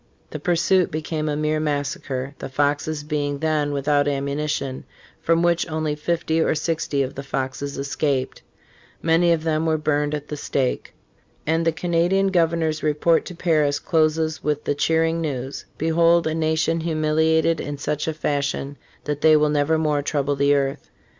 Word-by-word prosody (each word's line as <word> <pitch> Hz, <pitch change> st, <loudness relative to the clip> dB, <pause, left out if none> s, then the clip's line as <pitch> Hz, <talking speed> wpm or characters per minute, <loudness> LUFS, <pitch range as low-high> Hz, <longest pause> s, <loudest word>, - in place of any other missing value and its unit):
The -, -, -5 dB
pursuit 180 Hz, +1 st, +2 dB
became 155 Hz, -1 st, -3 dB
a 145 Hz, -, -1 dB
mere 155 Hz, +1 st, 0 dB
massacre 140 Hz, -3 st, -3 dB
(the -, -, -6 dB
Foxes 145 Hz, +2 st, 0 dB
being 145 Hz, -1 st, -2 dB
then 155 Hz, -1 st, 0 dB
without 145 Hz, +1 st, +1 dB
ammunition), 140 Hz, -1 st, -2 dB, 0.4 s
from 165 Hz, +1 st, +2 dB
which 175 Hz, 0 st, +1 dB
only 155 Hz, -1 st, -1 dB
fifty 160 Hz, +1 st, -1 dB
or -, -, +2 dB
sixty 150 Hz, -3 st, -1 dB
of 130 Hz, -, -5 dB
the 140 Hz, -, -6 dB
Foxes 135 Hz, +1 st, -4 dB
escaped. 140 Hz, -1 st, -2 dB, 0.6 s
Many 170 Hz, +1 st, +3 dB
of 165 Hz, -2 st, +1 dB
them 160 Hz, 0 st, 0 dB
were 160 Hz, -1 st, +2 dB
burned 150 Hz, -1 st, 0 dB
at 150 Hz, 0 st, -6 dB
the 150 Hz, -, -3 dB
stake. 135 Hz, -3 st, -2 dB, 0.5 s
And 165 Hz, +2 st, +1 dB
the -, -, +4 dB
Canadian 175 Hz, +4 st, +1 dB
governor's 165 Hz, -3 st, +1 dB
report 155 Hz, +2 st, +2 dB
to 180 Hz, -, -8 dB
Paris 155 Hz, -4 st, +2 dB
closes 155 Hz, -1 st, 0 dB
with 150 Hz, 0 st, -1 dB
the -, -, 0 dB
cheering 165 Hz, +3 st, +1 dB
news: 135 Hz, -3 st, -4 dB
"Behold 165 Hz, +2 st, +3 dB
a 160 Hz, -, 0 dB
nation 160 Hz, +1 st, +1 dB
humiliated 160 Hz, 0 st, +1 dB
in 145 Hz, 0 st, -5 dB
such 150 Hz, +2 st, -2 dB
a 160 Hz, -, 0 dB
fash 140 Hz, -2 st, -1 dB
ion 140 Hz, +1 st, -6 dB, 0.3 s
that 145 Hz, -1 st, -3 dB
they 155 Hz, -1 st, +6 dB
will 150 Hz, 0 st, +2 dB
nevermore 150 Hz, 0 st, +1 dB
trouble 145 Hz, -1 st, -1 dB
the 140 Hz, +1 st, +3 dB
earth." 140 Hz, 0 st, -2 dB
155 Hz, 165 wpm, -22 LUFS, 145-160 Hz, 0.6 s, they